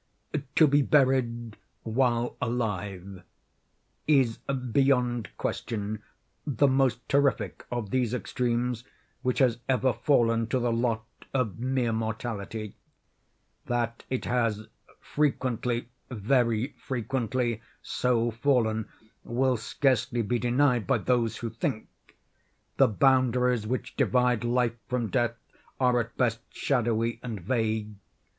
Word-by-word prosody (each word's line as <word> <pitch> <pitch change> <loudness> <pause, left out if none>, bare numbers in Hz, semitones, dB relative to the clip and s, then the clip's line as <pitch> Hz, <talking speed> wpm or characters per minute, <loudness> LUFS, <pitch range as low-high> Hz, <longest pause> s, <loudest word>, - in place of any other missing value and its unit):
To 160 - +7
be 145 0 +4
buried 130 -5 +2 0.3
while 120 0 +1
alive 100 -6 -3 0.9
is, 135 -7 +3
beyond 125 -2 +1
question, 105 -1 -3 0.4
the 145 0 +2
most 130 -3 +1
terrific 140 -2 +1
of 120 -5 -3
these 125 -4 +1
extremes 125 -1 -1 0.4
which 125 -1 0
has 120 -4 +3
ever 130 -1 +3
fallen 115 -5 +2
to 130 - 0
the 120 -2 +1
lot 115 -1 0 0.3
of 120 -5 0
mere 125 -2 0
mortality. 110 -1 -4 0.9
That 120 -1 -1
it 130 - -2
has 115 -3 0 0.3
frequently, 125 -5 -1 0.2
very 115 +1 +1
frequently, 125 -2 -2 0.2
so 120 -2 +1
fallen 115 -3 +1 0.4
will 130 +2 +1
scarcely 120 0 0
be 120 +3 0
denied 125 0 +2
by 135 - +3
those 115 +1 +1
who 115 -2 -4
think. 110 -1 -3 0.9
The - - +6
boundaries 125 -1 +3
which 130 +3 -3
divide 125 -2 +2
Life 120 -1 +1
from 125 -3 -1
Death 120 -2 +1 0.4
are 125 -2 +3
at 115 0 -4
best 115 -3 +1
shadowy 115 -3 0
and 115 -4 -5
vague. 110 +1 -1
120 Hz, 110 wpm, -28 LUFS, 115-130 Hz, 0.9 s, To